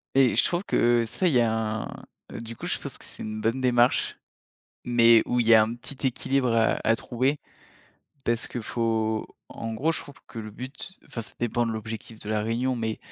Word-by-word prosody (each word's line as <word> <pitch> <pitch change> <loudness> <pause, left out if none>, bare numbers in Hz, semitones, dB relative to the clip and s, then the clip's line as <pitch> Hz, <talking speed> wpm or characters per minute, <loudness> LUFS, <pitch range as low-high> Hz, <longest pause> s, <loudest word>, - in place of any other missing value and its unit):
Et 135 -2 +5
je - - +5
trouve 175 +2 0
que 120 -9 +3
ça, 180 - 0
il 165 - +2
y 125 - +5
a 110 -1 0
un - - -6 0.5
du 115 0 -7
coup, - - -7
je - - 0
pense - - -7
que - - -12
c'est - - -8
une 110 0 -4
bonne 115 +4 0
démarche, 125 -1 +3 0.7
mais 115 -2 +6
où 125 - +1
il 115 - +1
y 115 - +9
a 110 - +8
un 110 +2 -1
petit 135 +3 -4
équilibre, 130 0 +1
heu, 115 -1 +3
à 115 - +4
trouver. 130 +5 0 0.8
Parce 115 0 0
que, 120 - -4
faut 110 -1 -1 0.2
en 115 0 -5
gros, 150 +9 +1
je - - -4
trouve 145 - -12
que - - -9
le 110 -1 -7
but 130 - -7
enfin, 115 - -5
ça 110 - -6
dépend 120 0 0
de 115 - -1
l'objectif 110 0 -6
de 105 - -8
la 110 -1 0
réunion, 120 +4 0
mais 110 -2 -2
115 Hz, 220 wpm, -26 LUFS, 110-125 Hz, 0.8 s, y